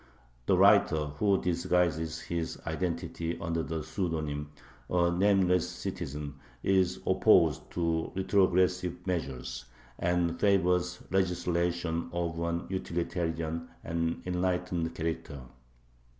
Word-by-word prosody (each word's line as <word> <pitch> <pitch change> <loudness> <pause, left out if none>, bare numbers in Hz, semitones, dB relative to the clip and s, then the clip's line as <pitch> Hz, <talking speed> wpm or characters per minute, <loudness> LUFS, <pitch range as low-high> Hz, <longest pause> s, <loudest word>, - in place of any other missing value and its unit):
The - - +4
writer, 75 -2 +5
who 100 -2 +3
disguises 85 -2 0
his 85 -1 -3
identity 85 -1 -2
under 85 0 -1
the 80 0 -3
pseudonym 75 -4 -3 0.4
"A 85 -1 +3
Nameless 90 -1 +3
Citizen," 70 0 -5 0.2
is 95 -2 +2
opposed - - +4
to 85 -2 0
retrogressive 90 -2 +2
measures, 65 -8 -3 0.3
and 85 -1 +1
favors 90 -2 +2
legislation 85 -2 0
of 85 -1 -2
an 85 +1 -1
utilitarian 85 -3 -2 0.2
and 85 0 -2
enlightened 90 -2 -1
character. 80 -3 -4
85 Hz, 95 wpm, -30 LUFS, 80-90 Hz, 0.4 s, writer